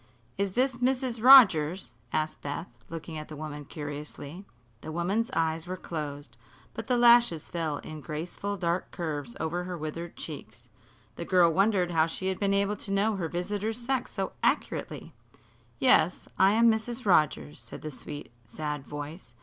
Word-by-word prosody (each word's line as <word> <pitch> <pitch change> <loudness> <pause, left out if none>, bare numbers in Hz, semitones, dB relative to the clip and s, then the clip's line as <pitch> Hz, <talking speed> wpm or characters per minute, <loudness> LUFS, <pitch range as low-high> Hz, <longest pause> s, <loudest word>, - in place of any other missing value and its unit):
"Is 195 -1 -1
this 255 +1 +1
Mrs. 250 -2 0
Rogers?" 190 - +7 0.2
asked 155 0 -1
Beth, 145 +4 -4 0.2
looking 165 -1 -6
at 155 - -8
the 155 - -8
woman 150 -1 -7
curiously. 150 +4 -7 0.4
The 155 - -7
woman's 190 +8 0
eyes 160 +1 0
were 185 +1 -4
closed, 145 -7 -6 0.4
but 225 - -6
the 250 - +2
lashes 235 -9 +5
fell 160 -4 -2
in 155 +1 -8
graceful 170 +8 -4
dark 175 0 -1
curves 145 -8 -4
over 170 +3 -2
her 180 -1 -5
withered 165 +2 -6
cheeks. - - -9 0.5
The - - -4
girl 175 -3 +4
wondered 195 -1 +2
how 160 -1 +3
she 185 +3 -3
had 190 - -3
been 200 -1 +1
able 200 +1 +1
to - - -8
know 205 +2 +2
her 170 -4 -2
visitors' 205 +5 -2
sex 255 +1 -2
so - - -3
accurately. - - -1 0.6
"Yes, - - +4
I 195 +1 +6
am 230 +1 +6
Mrs. 230 +2 -3
Rogers," 135 - +2
said - - -10
the 155 - -5
sweet, 145 -1 -8 0.2
sad 150 +2 -5
voice. 145 -3 -8
170 Hz, 165 wpm, -28 LUFS, 155-205 Hz, 0.6 s, Rogers